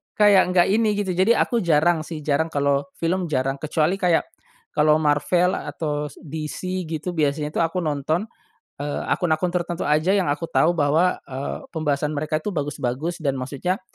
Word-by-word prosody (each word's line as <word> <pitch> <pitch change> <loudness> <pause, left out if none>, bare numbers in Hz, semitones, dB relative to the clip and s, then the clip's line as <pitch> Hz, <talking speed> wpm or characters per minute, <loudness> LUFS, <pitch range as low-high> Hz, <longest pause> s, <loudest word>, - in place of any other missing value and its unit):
kayak 205 -3 +5
enggak 175 - +5
ini 215 -1 +2
gitu. 200 -2 -1
Jadi 190 +6 +3
aku 235 - +1
jarang 165 -1 +3
sih, 155 -2 -7
jarang 155 +2 +1
kalau 140 -1 +1
film 175 +2 -1
jarang. 135 -2 -1
Kecuali 160 +5 0
kayak 175 -3 +3 0.5
kalau 150 0 +4
Marvel 155 +4 +2
atau 150 0 -3
s - - -16
DC 160 +4 -4
gitu 160 +2 -3
biasanya 150 -1 0
tuh - - -1
aku 170 +2 -1
nonton, 155 +4 -1 0.6
eee, 145 0 -3
akun-akun 175 +1 +1
tertentu 175 -1 -2
aja 155 +5 +2
yang 195 -3 +2
aku 145 +3 -1
tahu 175 +2 +3
bahwa, 160 +4 +2
eee, 135 +1 -5
pembahasan 150 -2 -1
mereka 155 +1 -2
itu 210 - -2
bagus-bagus 145 +1 -3
dan 135 -1 +1
maksudnya, 145 +9 -2
155 Hz, 170 wpm, -23 LUFS, 145-180 Hz, 0.6 s, kayak